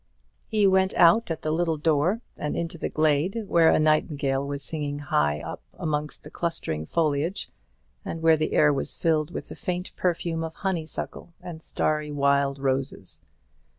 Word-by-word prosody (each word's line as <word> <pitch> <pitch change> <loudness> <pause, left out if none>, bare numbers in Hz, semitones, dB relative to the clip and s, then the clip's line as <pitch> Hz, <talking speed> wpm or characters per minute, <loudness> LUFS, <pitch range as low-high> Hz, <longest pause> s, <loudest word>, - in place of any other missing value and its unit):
He 215 -2 +2
went 190 0 +3
out 175 +6 +5
at 165 - -4
the 155 - 0
little 165 0 +1
door, 160 +8 +1
and 150 - -3
into 170 -1 -4
the - - -2
glade, 155 +8 +1
where 170 -4 +4
a - - +4
nightingale 145 -3 +1
was 140 0 -4
singing 145 -2 -3
high 75 - +1
up - - -7 0.2
amongst 150 -1 -3
the 150 - -11
clustering 80 - -3
foliage, 160 +3 0 0.5
and 165 0 -5
where 165 -1 +6
the 155 0 -1
air 150 -1 +5
was 135 - -3
filled 155 -2 +1
with - - -7
the - - -8
faint 180 0 -4
perfume 170 -2 -1
of 160 0 -6
honeysuckle 170 -2 -4
and 165 -2 -8
starry 150 -1 -1
wild 140 -1 +2
roses. 135 -7 -2
155 Hz, 165 wpm, -26 LUFS, 145-170 Hz, 0.5 s, where